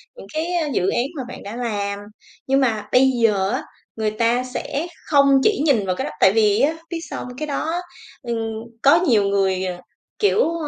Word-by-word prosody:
những -, -, -12 dB
cái, 325 Hz, +3 st, -2 dB
a, 335 Hz, -3 st, 0 dB
dự 185 Hz, -3 st, +1 dB
án 240 Hz, -, +1 dB
mà 265 Hz, -, -3 dB
bạn 250 Hz, -, -9 dB
đã 205 Hz, +3 st, -7 dB
làm. 205 Hz, -4 st, -2 dB, 0.5 s
Nhưng 270 Hz, +1 st, +3 dB
mà 225 Hz, -5 st, 0 dB
bây 265 Hz, +1 st, +5 dB
giờ 200 Hz, -4 st, +3 dB
á, -, -, -2 dB, 0.3 s
người 220 Hz, -1 st, -1 dB
ta 230 Hz, +3 st, +1 dB
sẽ 275 Hz, +5 st, -4 dB, 0.2 s
không 280 Hz, -2 st, +4 dB
chỉ 425 Hz, -8 st, +2 dB
nhìn 245 Hz, -10 st, +3 dB
vào 185 Hz, -1 st, -1 dB
cái -, -, -3 dB
đó, -, -, -4 dB
tại 190 Hz, -, +6 dB
vì 210 Hz, -1 st, +3 dB
á, 290 Hz, +4 st, +3 dB, 0.2 s
biết 340 Hz, -, -3 dB
sao -, -, -5 dB
hông? 250 Hz, 0 st, -10 dB
Cái 305 Hz, +2 st, -4 dB
đó 320 Hz, +4 st, -2 dB, 0.4 s
ừm, 235 Hz, -3 st, -3 dB, 0.4 s
có 280 Hz, +3 st, +6 dB
nhiều 220 Hz, -6 st, +4 dB
người, 195 Hz, -2 st, +1 dB
ờ, 180 Hz, -1 st, -3 dB, 0.4 s
kiểu, 425 Hz, 0 st, +3 dB
ờ, 335 Hz, -2 st, -3 dB
245 Hz, 215 wpm, -21 LUFS, 205-290 Hz, 0.5 s, tại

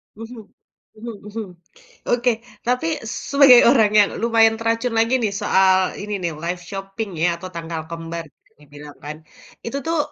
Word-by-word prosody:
Mhm, 225 Hz, +1 st, -9 dB, 0.5 s
mhm 235 Hz, +2 st, -8 dB, 0.2 s
mhm. 215 Hz, 0 st, -5 dB, 0.6 s
Oke, 245 Hz, +1 st, +2 dB, 0.4 s
tapi 250 Hz, +6 st, 0 dB, 0.4 s
sebagai 275 Hz, -3 st, +8 dB
orang 220 Hz, -5 st, +4 dB
yang 205 Hz, -, +5 dB
lumayan 225 Hz, -1 st, +4 dB
teracun 230 Hz, +1 st, -1 dB
lagi 230 Hz, +3 st, +2 dB
nih, 205 Hz, -3 st, -1 dB
soal, 190 Hz, -1 st, +3 dB
ini 210 Hz, 0 st, -5 dB
nih, 170 Hz, -, -1 dB
live 175 Hz, +1 st, -3 dB
shopping 195 Hz, +2 st, -5 dB
ya, 175 Hz, -, +4 dB
atau 185 Hz, +2 st, -8 dB
tanggal 165 Hz, -1 st, -5 dB
kembar, 165 Hz, 0 st, -6 dB
bisa -, -, -37 dB
dibilang 145 Hz, 0 st, -13 dB
kan. 150 Hz, +1 st, -6 dB, 0.5 s
Itu 270 Hz, +4 st, -3 dB
tuh, 330 Hz, 0 st, 0 dB
215 Hz, 155 wpm, -21 LUFS, 175-235 Hz, 0.6 s, sebagai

